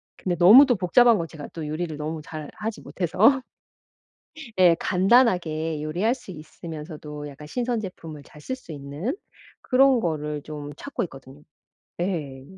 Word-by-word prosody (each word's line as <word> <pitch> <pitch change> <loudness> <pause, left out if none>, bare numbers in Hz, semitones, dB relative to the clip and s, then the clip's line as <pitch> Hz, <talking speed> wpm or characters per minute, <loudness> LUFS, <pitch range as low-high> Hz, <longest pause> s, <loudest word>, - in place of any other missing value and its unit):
근데 180 -2 -2
너무 210 - +9
또 245 - +3
복잡한 225 +5 +5
거 165 - -2
제가 150 -3 -9
또 160 -2 -5
요리를 155 0 -4
너무 155 +1 -4
잘하지 165 +8 -6
못해서 215 - +2 1.2
예 180 -2 +7
간단하게 180 -7 +2
요리할 180 +11 0
수 240 -7 -11
있으면서도 150 -2 -8
약간 145 +1 -11
신선 245 +3 -1
제품을 165 -7 -8
잘 150 +1 -16
쓸 260 - -4
수 250 -10 -13
있는 145 - -4 0.5
그런 265 -1 +4
거를 150 -4 -2
좀 145 -1 -7
찾고 280 - -4
있거든요. 135 -3 -11 0.6
예. 150 -8 -3
165 Hz, 290 characters per minute, -24 LUFS, 150-215 Hz, 1.2 s, 너무